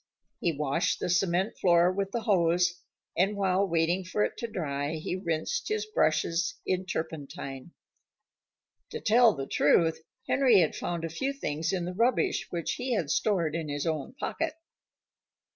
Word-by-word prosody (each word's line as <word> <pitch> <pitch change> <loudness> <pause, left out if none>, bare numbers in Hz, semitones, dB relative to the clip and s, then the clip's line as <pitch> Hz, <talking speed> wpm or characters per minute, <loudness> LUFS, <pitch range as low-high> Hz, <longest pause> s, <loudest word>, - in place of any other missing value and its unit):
He 170 - +1
washed 150 +5 0
the - - -2
cement 180 +3 +1
floor 175 0 +4
with 195 +1 -2
the 235 - -2
hose, 175 -4 +2 0.3
and 195 +4 +1
while 195 0 +2
waiting 170 +2 +1
for 190 +3 -1
it - - -1
to 235 - -3
dry 145 -7 -3
he 160 +3 -3
rinsed 185 - -2
his 430 0 -1
brushes 175 - +1
in 185 0 -1
turpentine. 145 -3 -5 1.2
To 460 - -5
tell 230 - +5
the 135 -1 -4
truth, 160 +4 +3 0.3
Henry 250 -8 +5
had 160 - +1
found 170 -1 -3
a - - -3
few 265 - -2
things 155 - -2
in 180 -3 -1
the 180 - -4
rubbish 235 +6 +1
which 170 -2 -2
he 250 -1 -1
had 160 -9 -1
stored 175 -8 +1
in 160 -2 -3
his 145 +2 -3
own 160 - -2
pocket. 315 +3 -3
175 Hz, 160 wpm, -28 LUFS, 160-205 Hz, 1.2 s, tell